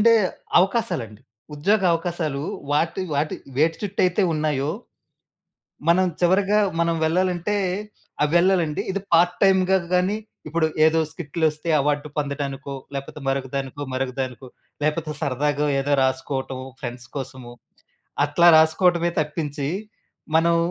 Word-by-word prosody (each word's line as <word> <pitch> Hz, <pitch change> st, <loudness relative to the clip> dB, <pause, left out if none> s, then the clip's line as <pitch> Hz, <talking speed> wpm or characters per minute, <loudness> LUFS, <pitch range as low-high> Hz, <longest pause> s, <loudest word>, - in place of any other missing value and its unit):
మనకుండే 230 Hz, +2 st, +6 dB, 0.4 s
అవకాశాలండి. 175 Hz, -, 0 dB, 0.3 s
ఉద్యోగ 195 Hz, +8 st, +2 dB
అవకాశాలూ 165 Hz, -4 st, -2 dB, 0.3 s
వాటి 165 Hz, +5 st, +1 dB
వాటి 150 Hz, +2 st, 0 dB, 0.2 s
వేటి 160 Hz, +3 st, +2 dB
చుట్టయితే 195 Hz, -1 st, +1 dB
ఉన్నాయో 150 Hz, -2 st, 0 dB, 1.2 s
మనం 185 Hz, +2 st, +5 dB, 0.2 s
చివరగా, 195 Hz, +4 st, +3 dB, 0.2 s
మనం 170 Hz, 0 st, +2 dB
వెళ్ళాలంటే, 180 Hz, +4 st, 0 dB, 0.7 s
ఆహ్, 150 Hz, -, +3 dB
వెళ్ళాలండి. 175 Hz, -1 st, +3 dB
ఇది 200 Hz, 0 st, -3 dB
పార్ట్ 175 Hz, +1 st, +4 dB
టైమ్‌గా 190 Hz, 0 st, +4 dB, 0.2 s
గానీ, 185 Hz, +4 st, +2 dB, 0.3 s
ఇప్పుడు 160 Hz, +1 st, +1 dB, 0.2 s
ఏదో 160 Hz, +1 st, +4 dB
స్కిట్‌లొస్తే 160 Hz, 0 st, -2 dB
అవార్డు 145 Hz, +1 st, 0 dB
పొందటానికో, 140 Hz, -1 st, -3 dB, 0.2 s
లేపోతే 140 Hz, +2 st, -6 dB
మరొకదానికో, 135 Hz, +1 st, -3 dB
మరొకదానికో, 130 Hz, 0 st, -3 dB, 0.4 s
లేపోతే 155 Hz, +1 st, -1 dB
సరదాగో 145 Hz, +1 st, 0 dB
ఏదో 145 Hz, +1 st, 0 dB
రాసుకోటం 130 Hz, 0 st, -2 dB, 0.2 s
ఫ్రెండ్స్ 120 Hz, 0 st, -6 dB
కోసము. 130 Hz, -2 st, -7 dB, 0.7 s
అట్లా 160 Hz, +4 st, +4 dB
రాసుకోటమే 170 Hz, +2 st, +3 dB
తప్పించి, 150 Hz, -2 st, -3 dB, 0.7 s
మనం 170 Hz, +1 st, +3 dB
155 Hz, 105 wpm, -23 LUFS, 140-175 Hz, 1.2 s, మనకుండే